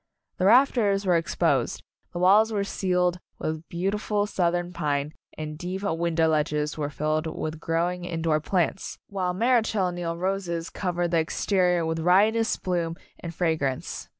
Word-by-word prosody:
The 185 Hz, -, +2 dB
rafters 215 Hz, -4 st, +4 dB
were 180 Hz, -, +3 dB
ex 165 Hz, 0 st, 0 dB
posed, -, -, +1 dB, 0.3 s
the -, -, -6 dB
walls 205 Hz, +5 st, +5 dB
were 205 Hz, -2 st, 0 dB
ceiled 180 Hz, -2 st, 0 dB, 0.2 s
with 155 Hz, +1 st, -4 dB
beauti 195 Hz, +4 st, -1 dB
ful 210 Hz, -1 st, 0 dB
Southern 175 Hz, -3 st, -1 dB
pine 145 Hz, -2 st, -1 dB, 0.2 s
and 155 Hz, -1 st, -5 dB
the -, -, -10 dB
deep 185 Hz, +4 st, -5 dB
window 165 Hz, -3 st, +1 dB
ledges 150 Hz, -1 st, 0 dB
were 145 Hz, -2 st, -2 dB
filled 155 Hz, +2 st, -1 dB
with 155 Hz, 0 st, -4 dB
growing, 175 Hz, +2 st, -1 dB
indoor 165 Hz, -3 st, 0 dB
plants, 180 Hz, +3 st, -1 dB
while 185 Hz, -2 st, -2 dB
Marechal 220 Hz, -4 st, +2 dB
Neil 170 Hz, -1 st, -4 dB
roses 180 Hz, -2 st, -2 dB
cov 180 Hz, -3 st, -3 dB
ered 175 Hz, -1 st, 0 dB
the 170 Hz, -, +3 dB
exterior 180 Hz, +1 st, +1 dB
with 160 Hz, 0 st, -2 dB
riotous 210 Hz, +7 st, +3 dB
bloom 170 Hz, -3 st, -2 dB, 0.2 s
and 170 Hz, -, -6 dB
fragrance. 155 Hz, -7 st, -2 dB
175 Hz, 160 wpm, -26 LUFS, 160-195 Hz, 0.3 s, walls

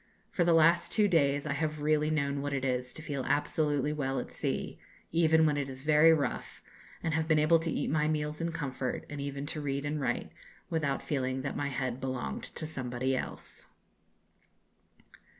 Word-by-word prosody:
For 175 Hz, -, +2 dB
the 170 Hz, 0 st, +4 dB
last 165 Hz, +2 st, +4 dB
two 210 Hz, -2 st, +4 dB
days 145 Hz, -5 st, +2 dB
I 145 Hz, -, -1 dB
have 155 Hz, +1 st, -2 dB
really 155 Hz, 0 st, +2 dB
known 140 Hz, -2 st, 0 dB
what 145 Hz, 0 st, -2 dB
it 135 Hz, -1 st, -1 dB
is 125 Hz, -1 st, -1 dB
to 160 Hz, -, -10 dB
feel 140 Hz, -4 st, -3 dB
absolutely 145 Hz, 0 st, +1 dB
well 135 Hz, -3 st, -1 dB
at -, -, -7 dB
sea, -, -, -2 dB, 0.3 s
even 160 Hz, -1 st, +4 dB
when 150 Hz, -2 st, +2 dB
it 140 Hz, -1 st, -2 dB
is 135 Hz, 0 st, -8 dB
very 155 Hz, +2 st, +6 dB
rough, 155 Hz, -3 st, -1 dB, 0.4 s
and 160 Hz, -, 0 dB
have 160 Hz, 0 st, 0 dB
been 155 Hz, -1 st, +4 dB
able 155 Hz, +2 st, +5 dB
to 165 Hz, +1 st, -2 dB
eat 145 Hz, -, -1 dB
my 150 Hz, 0 st, +1 dB
meals 150 Hz, 0 st, -1 dB
in 165 Hz, 0 st, -1 dB
comfort, 135 Hz, -5 st, -3 dB
and 145 Hz, -1 st, -4 dB
even 140 Hz, 0 st, -4 dB
to 150 Hz, -, -4 dB
read 140 Hz, 0 st, -2 dB
and 150 Hz, 0 st, -2 dB
write, 125 Hz, -2 st, -1 dB, 0.4 s
without 150 Hz, -4 st, 0 dB
feeling 130 Hz, -2 st, -1 dB
that 140 Hz, -, -3 dB
my 145 Hz, -, -1 dB
head 130 Hz, -2 st, -3 dB
belonged 125 Hz, -, -3 dB
to -, -, -6 dB
somebody 130 Hz, -3 st, -2 dB
else." -, -, -6 dB
145 Hz, 190 wpm, -31 LUFS, 135-155 Hz, 0.4 s, very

